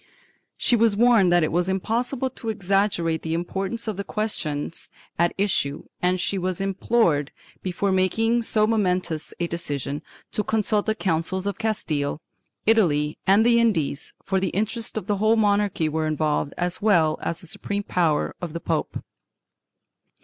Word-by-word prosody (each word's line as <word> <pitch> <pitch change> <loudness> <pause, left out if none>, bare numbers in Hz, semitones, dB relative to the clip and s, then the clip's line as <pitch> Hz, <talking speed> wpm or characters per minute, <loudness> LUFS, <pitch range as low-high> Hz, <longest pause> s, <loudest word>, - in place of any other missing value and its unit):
She 245 - +3
was 225 -2 +3
warned 225 -6 +5
that 175 -1 +4
it 155 - 0
was 175 +3 +1
impossible 240 +7 -1
to 230 -2 -6
exaggerate 195 -5 0
the 160 0 -2
importance 195 +7 -3
of 215 -3 -2
the 200 - -3
questions 165 -9 -3 0.3
at 170 0 +3
issue 190 -8 0 0.2
and 180 +1 +2
she 195 +2 -1
was 185 -1 -2
implored, 195 -6 +1 0.3
before 190 +2 -1
making 225 +6 +2
so 215 -2 +2
momentoiis 185 -7 0
a 175 - +1
decision, 145 -4 -3 0.3
to 210 - 0
consult 215 0 +1
the 220 - +1
Councils 185 -1 -1
of 200 +2 -3
Castile, 155 -11 -1 0.5
Italy 155 -10 +2
and 200 +4 +5
the 235 0 +5
Indies, 165 -11 0
for 190 0 +1
the 190 -1 0
interests 220 +4 -1
of 215 - -3
the 205 0 0
whole 215 +3 +3
monarchy 205 -6 +2
were 155 +1 -1
involved 150 -2 -1
as 175 0 -1
well 170 -7 +3
as 170 - -3
the - - -7
supreme 200 +4 -4
power 170 -6 +1
of 170 -3 -5
the 170 - -3
pope. 165 -2 -2
190 Hz, 160 wpm, -24 LUFS, 165-215 Hz, 0.5 s, warned